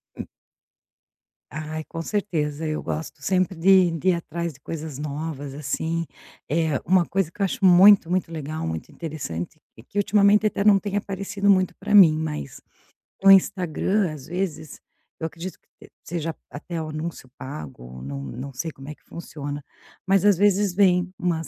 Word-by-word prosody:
Hum. -, -, -7 dB, 1.2 s
Ai, 155 Hz, +2 st, -5 dB
com 165 Hz, -, -6 dB
certeza. 160 Hz, -6 st, -2 dB
Eu 155 Hz, -, -3 dB
gosto 155 Hz, -1 st, -5 dB
sempre 185 Hz, +3 st, +1 dB
de 185 Hz, +1 st, +5 dB
de 165 Hz, +3 st, 0 dB
ir -, -, +5 dB
atrás 170 Hz, -1 st, -4 dB
de 135 Hz, -, -19 dB
coisas 155 Hz, -1 st, -6 dB
novas, 145 Hz, -1 st, -5 dB
assim, 160 Hz, +4 st, -2 dB, 0.4 s
eh, 160 Hz, -2 st, +1 dB
uma 180 Hz, -1 st, +4 dB
coisa 185 Hz, -3 st, -1 dB
que 205 Hz, -, -10 dB
eu -, -, +4 dB
acho 205 Hz, +3 st, -4 dB
muito 185 Hz, 0 st, +7 dB
muito 180 Hz, -2 st, 0 dB
legal, 155 Hz, -, -4 dB
muito 80 Hz, 0 st, -5 dB
interessante, 145 Hz, -, -6 dB, 0.2 s
e 110 Hz, -, -13 dB
que 200 Hz, -, -10 dB
ultimamente 205 Hz, +1 st, +4 dB
até 200 Hz, -, -1 dB
não 205 Hz, -1 st, +6 dB
tem 205 Hz, 0 st, -3 dB
aparecido 200 Hz, 0 st, -2 dB
muito 185 Hz, -2 st, +4 dB
para 210 Hz, +1 st, 0 dB
mim, 180 Hz, -6 st, +9 dB
mas 150 Hz, -, -5 dB, 0.6 s
no 195 Hz, -, +9 dB
Instagram, 190 Hz, -1 st, +3 dB
às 145 Hz, -4 st, -10 dB
vezes, 170 Hz, -4 st, -4 dB, 0.4 s
eu 160 Hz, -, -3 dB
acredito 170 Hz, +3 st, -6 dB
que -, -, -43 dB, 0.2 s
se -, -, -19 dB
seja 165 Hz, -2 st, -4 dB, 0.2 s
até 165 Hz, +3 st, -6 dB
o 155 Hz, -, -5 dB
anúncio 155 Hz, -2 st, -6 dB
pago, 65 Hz, -, -8 dB
não 70 Hz, 0 st, -5 dB
não 130 Hz, -, -7 dB
sei 160 Hz, +6 st, -4 dB
como 135 Hz, -1 st, -11 dB
é 150 Hz, -, -5 dB
que -, -, -37 dB
funciona. 145 Hz, -3 st, -7 dB, 0.4 s
Mas, 195 Hz, 0 st, +3 dB
às 205 Hz, -4 st, +5 dB
vezes, 200 Hz, -1 st, +3 dB
vem 185 Hz, -2 st, +3 dB
umas 165 Hz, -3 st, -1 dB
165 Hz, 175 wpm, -24 LUFS, 150-190 Hz, 1.2 s, mim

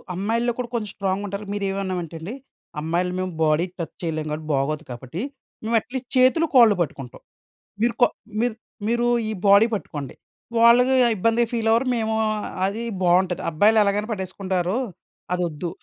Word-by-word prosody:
అమ్మాయిల్లో 230 Hz, +5 st, 0 dB
కూడా 245 Hz, -1 st, -4 dB
కొంచెం 215 Hz, -3 st, -2 dB
స్ట్రాంగ్‌గుంటారు. 200 Hz, +1 st, -3 dB
మీరేమన్నామంటేండి 190 Hz, -3 st, -3 dB, 0.5 s
అమ్మాయిలు 175 Hz, +3 st, -1 dB
మేము 185 Hz, -1 st, -2 dB
బాడీ 155 Hz, +3 st, +3 dB
టచ్ 165 Hz, -, -5 dB
చేయలేం 155 Hz, -2 st, -2 dB
కాబట్టి 155 Hz, 0 st, -5 dB
బాగోదు 145 Hz, +3 st, 0 dB
కాబట్టి 130 Hz, +8 st, -6 dB, 0.4 s
మేము 225 Hz, +2 st, 0 dB
అట్లీస్ట్ 245 Hz, +2 st, -6 dB
చేతులు, 260 Hz, +6 st, +5 dB
కాళ్ళు 230 Hz, -5 st, +7 dB
పట్టుకుంటాం. 135 Hz, -6 st, -5 dB, 0.6 s
మీరు 235 Hz, 0 st, +2 dB
కొ -, -, +9 dB, 0.4 s
మీరు 240 Hz, -2 st, 0 dB, 0.3 s
మీరు 235 Hz, +1 st, +1 dB, 0.2 s
ఈ -, -, -1 dB, 0.2 s
బాడీ 200 Hz, +3 st, +7 dB
పట్టుకోండి. 145 Hz, -9 st, -6 dB, 0.4 s
వాళ్ళకి 245 Hz, +3 st, +6 dB, 0.2 s
ఇబ్బందిగా 230 Hz, +4 st, +2 dB
ఫీలవ్వరు. 230 Hz, +2 st, +2 dB
మేము 220 Hz, -1 st, -1 dB, 0.5 s
అది 210 Hz, +4 st, -2 dB, 0.2 s
బావుంటది. 180 Hz, 0 st, +2 dB
అబ్బాయిలు 210 Hz, +8 st, +4 dB
ఎలాగైనా 205 Hz, +2 st, 0 dB
పట్టేసుకుంటారు. 185 Hz, -1 st, -2 dB, 0.6 s
అదొద్దు. 175 Hz, -1 st, -2 dB
200 Hz, 135 wpm, -23 LUFS, 175-230 Hz, 0.6 s, కొ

